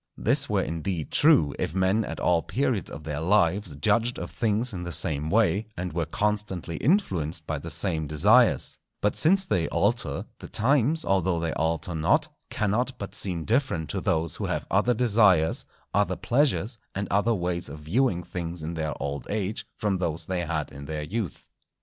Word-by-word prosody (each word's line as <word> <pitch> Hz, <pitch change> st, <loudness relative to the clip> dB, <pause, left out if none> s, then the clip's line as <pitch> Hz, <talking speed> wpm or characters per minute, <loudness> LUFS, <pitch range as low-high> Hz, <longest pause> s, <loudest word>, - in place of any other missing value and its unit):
This -, -, +2 dB
were -, -, +1 dB
indeed 85 Hz, 0 st, -3 dB
true, 145 Hz, -, +4 dB
if 80 Hz, -, -2 dB
men 95 Hz, +4 st, +2 dB
at -, -, -6 dB
all 85 Hz, -2 st, +2 dB
periods 125 Hz, -4 st, -1 dB
of 75 Hz, -, -9 dB
their 75 Hz, -1 st, -4 dB
lives 90 Hz, -1 st, +2 dB
judged 115 Hz, +11 st, +1 dB
of -, -, -6 dB
things 115 Hz, 0 st, 0 dB
in 90 Hz, -, -5 dB
the 85 Hz, 0 st, -5 dB
same 75 Hz, -2 st, +1 dB
way, 110 Hz, +1 st, +2 dB
and 90 Hz, -1 st, -4 dB
were 85 Hz, -1 st, -1 dB
constantly 100 Hz, -3 st, -2 dB
influenced 90 Hz, -, 0 dB
by 75 Hz, -2 st, -3 dB
the 80 Hz, -, -7 dB
same 80 Hz, -4 st, -2 dB
desires; 75 Hz, 0 st, +3 dB, 0.2 s
but 105 Hz, -, +1 dB
since 190 Hz, +4 st, +4 dB
they 85 Hz, -, 0 dB
alter, -, -, 0 dB
the -, -, -9 dB
times, 140 Hz, +6 st, +2 dB
although 95 Hz, -3 st, +1 dB
they 80 Hz, -1 st, -2 dB
alter 80 Hz, +2 st, -1 dB
not, 80 Hz, 0 st, +2 dB, 0.2 s
cannot 120 Hz, +5 st, -1 dB
but 100 Hz, -4 st, -7 dB
seem 85 Hz, -5 st, 0 dB
different 110 Hz, -, 0 dB
to -, -, -3 dB
those 80 Hz, -2 st, 0 dB
who -, -, -3 dB
have -, -, -2 dB
other 110 Hz, +5 st, +3 dB
desires, 105 Hz, -8 st, +3 dB, 0.3 s
other -, -, +2 dB
pleasures, 120 Hz, -3 st, +1 dB, 0.2 s
and 100 Hz, +1 st, -2 dB
other 105 Hz, +4 st, +2 dB
ways 90 Hz, -2 st, -2 dB
of 70 Hz, -, -8 dB
viewing 90 Hz, -, +1 dB
things 85 Hz, -1 st, -5 dB
in 80 Hz, +2 st, -4 dB
their 80 Hz, -2 st, -3 dB
old 70 Hz, -2 st, -4 dB
age 105 Hz, 0 st, -3 dB
from 100 Hz, -3 st, 0 dB
those 85 Hz, -2 st, -2 dB
they 95 Hz, 0 st, -2 dB
had 80 Hz, -3 st, -3 dB
in 70 Hz, 0 st, -9 dB
their 75 Hz, +1 st, -4 dB
youth. 95 Hz, 0 st, -4 dB
90 Hz, 180 wpm, -26 LUFS, 80-110 Hz, 0.3 s, true